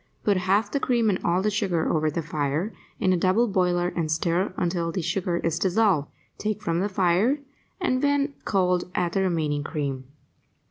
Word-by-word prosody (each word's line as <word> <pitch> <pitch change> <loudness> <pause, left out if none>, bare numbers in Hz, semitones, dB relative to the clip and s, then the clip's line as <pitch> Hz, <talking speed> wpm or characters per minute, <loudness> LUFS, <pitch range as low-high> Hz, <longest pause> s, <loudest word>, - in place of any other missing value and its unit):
Put 205 - +3
half 190 +4 +1
the 280 - 0
cream 235 -5 +2
and 185 - -1
all 175 +2 +1
the 210 - +1
sugar 195 -6 0
over 155 -1 +1
the 165 +2 -3
fire 150 +6 -2 0.3
in 185 - +3
a - - +2
double 190 +7 +3
boiler 180 -3 +1
and 165 -3 -2
stir 170 +4 0
until 170 -1 -1
the 180 0 -3
sugar 175 +1 -1
is 165 -1 -1
dissolved; 190 -6 +2 0.3
take 215 0 -2
from 170 -5 -1
the 200 +3 0
fire 190 +8 +2 0.4
and, 255 -9 0
when 285 0 +1
cold, 180 -3 +1
add 175 -1 0
the 195 - +1
remaining 155 -6 0
cream. 140 -4 -3
180 Hz, 185 wpm, -25 LUFS, 165-205 Hz, 0.4 s, Put